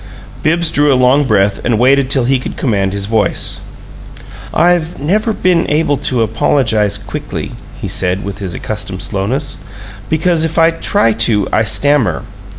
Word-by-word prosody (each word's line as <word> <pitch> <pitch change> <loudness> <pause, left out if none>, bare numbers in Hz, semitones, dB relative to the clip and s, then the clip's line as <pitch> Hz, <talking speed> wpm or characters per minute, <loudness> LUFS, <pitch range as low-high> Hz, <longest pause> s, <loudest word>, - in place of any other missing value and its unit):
Bibbs 165 +2 +1
drew 145 0 +3
a - - +4
long 130 +3 +3
breath 100 -4 +1
and 120 -3 +1
waited 130 +3 +3
till 135 -2 +2
he 130 +1 +2
could - - -7
command 100 -6 0
his 100 0 -3
voice. 110 -1 0 0.9
"I've 175 -1 +1
never 210 +10 0
been 180 -4 +1
able 150 -1 +1
to 125 -3 0
apologize 110 -1 +1
quickly," - - -6 0.3
he - - -4
said, 95 +1 0
with 100 - -6
his 95 -4 -5
accustomed - - -4
slowness, 120 +10 -2 0.5
"because 160 +1 +1
if 160 0 -2
I 165 0 +5
try 165 - +1
to 110 -2 +1
I - - +3
stammer. 110 - +2
130 Hz, 155 wpm, -14 LUFS, 105-155 Hz, 0.9 s, I